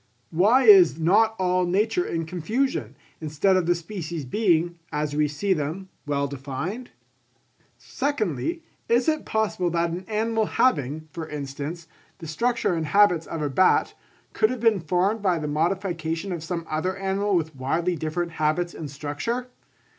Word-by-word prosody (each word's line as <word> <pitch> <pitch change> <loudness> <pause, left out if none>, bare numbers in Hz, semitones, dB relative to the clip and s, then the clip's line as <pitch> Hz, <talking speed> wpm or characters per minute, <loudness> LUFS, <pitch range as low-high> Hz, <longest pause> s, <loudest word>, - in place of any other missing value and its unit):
Why 210 +11 +4
is 190 - +7
not 215 +7 +3
all 185 -1 +1
nature 210 - +1
in 165 -1 -2
confusion, 175 - -2 0.2
instead 155 +5 +1
of 185 -2 +1
the 175 - +3
species 170 -3 -6
being, 170 - +1
as 150 -1 -2
we 150 0 +2
see 190 +7 0
them, 165 +4 -4 0.2
well 140 -1 0
defined? 140 - -5 0.9
Secondly, 285 - -2 0.3
is 240 +1 +3
it 310 -1 +1
possible 215 -5 0
that 170 0 0
an 180 +2 -5
animal 220 0 0
having, 155 - +1
for 160 +1 -6
instance, 150 +3 -6 0.3
the 165 - -10
structure 235 +6 0
and 160 -2 -2
habits 180 -2 +4
of 160 -2 -4
a 145 - 0
bat, 185 +8 +3 0.4
could 215 - +3
have 255 -1 -3
been 225 -3 +3
formed 185 +6 0
by 185 -4 +2
the 150 -1 -3
modification 165 +2 -1
of 170 -3 -4
some 170 0 -4
other 185 +5 -2
animal 195 +1 0
with 160 -3 -1
widely 165 +7 -1
different 170 +2 -3
habits 165 +3 0
and 155 -3 -7
structure? 150 - -4
175 Hz, 155 wpm, -25 LUFS, 155-205 Hz, 0.9 s, is